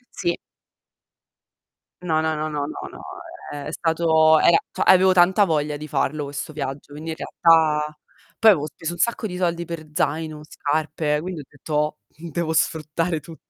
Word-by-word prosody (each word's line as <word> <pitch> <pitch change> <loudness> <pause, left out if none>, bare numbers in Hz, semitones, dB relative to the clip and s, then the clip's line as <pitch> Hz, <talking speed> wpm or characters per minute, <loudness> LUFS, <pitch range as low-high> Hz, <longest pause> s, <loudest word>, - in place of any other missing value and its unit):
Sì. 175 -3 -1 1.7
No, 160 -3 +1
no, 160 0 0
no, 155 +1 -2
no, 145 -1 -2 0.2
no, - - -12 0.5
ehm, 145 -1 -6
è - - -4
stato 160 -1 +3
era 170 -1 +6
cioè - - -6
avevo 185 0 +6
tanta 185 +3 +5
voglia 150 -3 -1
di 155 +1 -8
farlo 150 +1 -1
questo 145 +2 -6
viaggio, 145 -1 -6
quindi 160 +2 -6
in - - -4
realtà 155 -2 +2 0.4
poi 225 - +7
avevo 150 -6 +1
speso 165 +2 -6
un - - -8
sacco 220 +3 0
di 180 -1 -6
soldi 170 -1 -1
per 160 -2 -7
zaino, 155 0 -1
scarpe, 150 0 -1
quindi 175 -3 -5
ho - - -11
detto 150 +1 -2
devo 165 0 -4
sfruttare 160 +1 0
tu 160 +2 -12
160 Hz, 165 wpm, -23 LUFS, 150-170 Hz, 1.7 s, poi